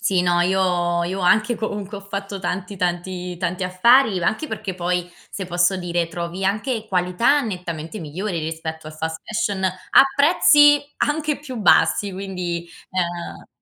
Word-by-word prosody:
Sì, 185 -2 +2
no. 175 -1 +2
Io 175 -2 +1
io 190 +2 -3
anche 215 +6 +3
comunque 205 -2 -4
ho - - -11
fatto 200 0 -6
tanti, 190 +1 -4
tanti, 180 0 -3
tanti 180 +1 -3
affari, 200 +2 +4
anche 220 - 0
perché 215 -5 -5
poi 180 0 -2 0.2
se 195 - -5
posso 175 +1 +1
dire, 175 -2 -1
trovi 170 +2 -5
anche 215 +3 -1
qualità 185 +10 +2
nettamente 180 -3 -5
migliore 175 +4 -4
rispetto 160 0 -5
al 155 0 -9
fast 160 +1 -4
fashion 200 -4 -2
a 185 0 +4
prezzi 290 -1 +6 0.2
anche 300 0 0
più 270 -4 -8
bassi, 195 0 +3
quindi, 180 -3 -4 0.2
ehm 175 -2 -4
185 Hz, 150 wpm, -21 LUFS, 175-210 Hz, 0.2 s, prezzi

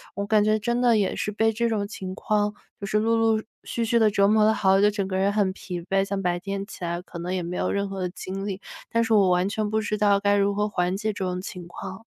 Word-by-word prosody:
我 200 - -2
感 210 0 +3
觉 215 +1 +3
真 240 +3 0
的 240 -2 +4
也 200 -3 0
是 210 - -2
被 225 +2 +2
这 235 +2 0
种 205 -3 -1
情 190 -3 -6
况， 210 0 0 0.3
就 200 - -5
是 210 - +1
陆 225 +2 +2
陆 225 -1 +2 0.2
续 235 - -2
续 235 +1 +2
地 220 -1 +5
折 200 -1 +3
磨 215 +1 +4
得 220 - +4
好 190 -2 +3
久 - - +3
就 - - -3
整 200 -2 -2
个 190 - -3
人 195 +1 +2
很 205 -2 +1
疲 180 -2 -6
惫， 195 +3 +1
像 195 0 -3
白 175 -1 0
天 195 +1 -4
起 200 - -10
来 170 0 -2
可 180 -1 -10
能 180 +2 -3
也 185 -1 -1
没 175 +1 -4
有 - - 0
任 200 0 -1
何 195 0 -5
的 180 - -1
精 190 +2 -6
力， 195 -1 -4 0.3
但 230 0 +2
是 225 0 +1
我 200 -3 +5
完 180 +1 +2
全 210 +1 -2
不 215 +1 +1
知 210 0 -2
道 205 -1 +3
该 205 0 +2
如 200 0 +2
何 210 +1 +1
缓 180 -2 -1
解 215 +1 -2
这 200 - -4
种 180 0 -2
情 180 -2 -8
况。 190 +4 -8
200 Hz, 310 characters per minute, -25 LUFS, 190-215 Hz, 0.3 s, 地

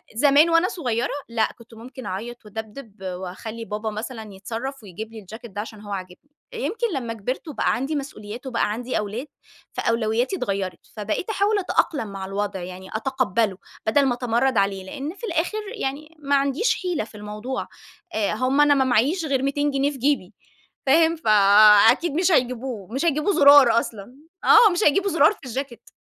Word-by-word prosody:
زمان 290 +6 +5
وأنا 330 +2 +4
صغيرة 245 -8 -2 0.2
لأ، 225 -1 +1
كنت 235 0 -17
ممكن 245 +3 -10
أعيّط 225 +5 -6
وأدبدب، 220 +1 -8
وأخلّي 190 +5 -6
بابا 215 0 -4
مثلًا 220 0 -7
يتصرف 230 +7 -6
ويجيب 215 +3 -8
لي 225 - -8
الجاكيت 220 +3 -11
ده 205 - -4
عشان 215 -1 -10
هو 205 -1 -9
عاجبني. 185 +8 -7 0.2
يمكن 470 0 -2
لمّا 240 -5 -3
كبرت 230 +8 -5
وبقى 300 - 0
عندي 270 +5 -2
مسؤوليات، 245 -3 -6
وبقى 230 -4 0
عندي 245 +4 -3
أولاد 215 +7 -4 0.5
فأولوياتي 230 - 0
اتغيرت. 195 - -3 0.2
فبقيت 215 - -3
أحاول 415 0 +1
أتأقلم 305 - 0
مع 195 -1 -6
الوضع 200 0 -3
يعني 185 +1 -9
أتقبّله 225 -4 0 0.3
بدل 275 +6 +3
ما 260 - +2
أتمرد 245 +1 0
عليه. 195 -1 +1
لأن 280 - -6
في 465 - -7
الآخر 350 +2 -1 0.2
يعني 300 +4 -4
ما 285 -1 +1
عنديش 280 - +1
حِيلة 355 -9 -1
في 215 - -13
الموضوع. 210 +5 -5 0.5
آآ 210 -1 0
هم 255 +6 +2
أنا 295 0 +6
ما 265 -1 +2
معييش 265 - +2
غير 270 -3 0
200 290 +1 0
جنيه 275 +1 +1
في 275 - -9
جيبي. 250 -7 0 0.5
فاهم؟ 325 +4 +4
فأكيد 215 - +6
مش 360 +4 +2
هيجيبوه، 250 - 0
مش 275 +6 -1
هيجيبوا 310 +5 +1
زرار 280 -5 +7
أصلًا، 225 +1 -8 0.3
آه 435 -4 +7
مش 355 +4 0
هيجيبوا 390 +7 +3
زرار 315 -1 +5
في - - -20
الجاكيت. 255 0 -6
245 Hz, 170 wpm, -23 LUFS, 215-285 Hz, 0.5 s, زرار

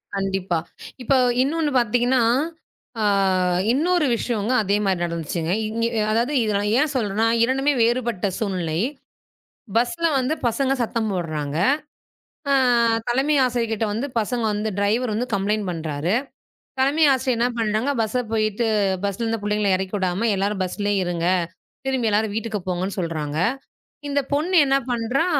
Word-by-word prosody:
கண்டிப்பா. 195 -2 -1 0.5
இப்போது 250 -1 +3
இன்னொன்று 305 +2 0
பார்த்தீங்க 240 0 +2
என்றால், 250 0 +3 0.6
அ - - +1 0.7
இன்னொரு 340 +4 +2
விஷயம்-ங்க, 230 0 -1
அதே 200 +1 +1
மாதிரி 185 -3 0
நடந்துச்சுங்க. 170 0 -3 0.2
இங்க 230 +2 -1 0.3
அதாவது 235 +6 +1
இதை 215 -1 0
நான் 205 +1 -1
ஏன் 300 0 +1
சொல்கிறேன் 210 -5 -1
என்றால், 230 +1 +3
2மே 270 +3 +1
வேறுபட்ட 235 -4 0
சூழ்நிலை. 180 -6 -2 1.0
பஸ்ஸில் 305 +6 +1
வந்து 260 +4 0
பசங்க 265 +4 0
சத்தம் 225 -1 -1
போடுகிறாங்க. 155 -5 -3 0.9
அ - - +5 0.5
தலைமை 270 +5 +2
ஆசிரியர் 240 -2 -1
கிட்ட 220 0 -1
வந்து 230 +7 -2
பசங்க 235 +2 -2
வந்து 210 +1 -2
டிரைவர் 215 +4 +1
வந்து 235 +4 -1
கம்ப்ளயண்ட் 205 +1 0
பண்ணுகிறார். 160 0 -2 0.7
தலைமை 285 +4 +3
ஆசிரியர் 260 -2 0
என்ன 240 - +3
பண்ணுகிறாங்க? 220 +4 0
பேருந்திற்குச் 220 -2 -1
சென்று, 210 -5 +1
பஸ்ஸில் 200 +3 -2
இருந்த 225 0 -1
புள்ளைகளை 210 0 0
இறக்கி 190 +1 -5
விடாமல் 190 +4 0
எல்லாரும் 200 0 -1
பஸ்ஸிலேயே 205 +2 -1
இருங்க. 175 -1 -1 0.6
திரும்பி 260 -3 0
எல்லாரும் 210 0 +1
வீட்டுக்குப் 220 -3 -3
போங்க 180 0 -1
என்று 195 - -5
சொல்கிறாங்க. 155 -4 -3 0.7
இந்தப் 285 -1 -1
பொண்ணு 320 +6 +1
என்ன 270 0 +2
பண்றா? 245 +5 0
220 Hz, 145 wpm, -22 LUFS, 195-250 Hz, 1.0 s, அ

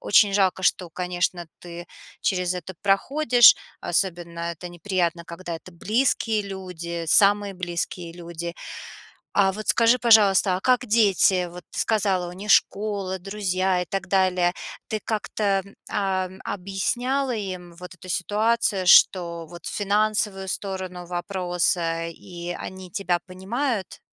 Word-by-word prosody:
Очень 205 0 +4
жалко, 190 -2 +2
что, 180 -1 +1
конечно, 175 -1 -2
ты 175 0 -9 0.4
через 180 -2 0
это 180 +1 -7
проходишь. 240 +5 +5 0.3
Особенно 170 -1 -2
это 170 +2 -8
неприятно, 175 -1 -2
когда 170 0 -7
это 165 - -10
близкие 220 +3 0
люди, 180 -4 -6
самые 200 +2 +4
близкие 175 -1 -4
люди. 170 0 -6 0.8
А 195 -1 +4
вот 215 +2 -7
скажи, 235 +2 +4
пожалуйста, 205 -5 +5
а - - -5
как 250 +1 +2
дети? 195 -4 +3
Вот 175 +1 -10
ты - - -8
сказала, 195 -5 +1
у - - -8
них 200 +4 -6
школа, 200 -3 +1
друзья 190 -2 0
и - - -4
так 195 +1 -4
далее. 185 -2 +2 0.4
Ты 215 - -2
как-то, 205 -2 -1 0.3
а, 190 -2 0
м, 190 +1 -13
объясняла 245 +8 -1
им 185 -4 -6
вот 180 +1 -10
эту 185 0 -14
ситуацию, 205 +1 0
что 170 -3 +5
вот 175 0 -12
финансовую 205 -1 0
сторону 185 -2 -5
вопроса, 175 -2 -1
и 175 +1 -8
они 185 -1 -8
тебя 175 -2 -1
понимают? 200 +4 -3
185 Hz, 130 wpm, -24 LUFS, 175-205 Hz, 0.8 s, проходишь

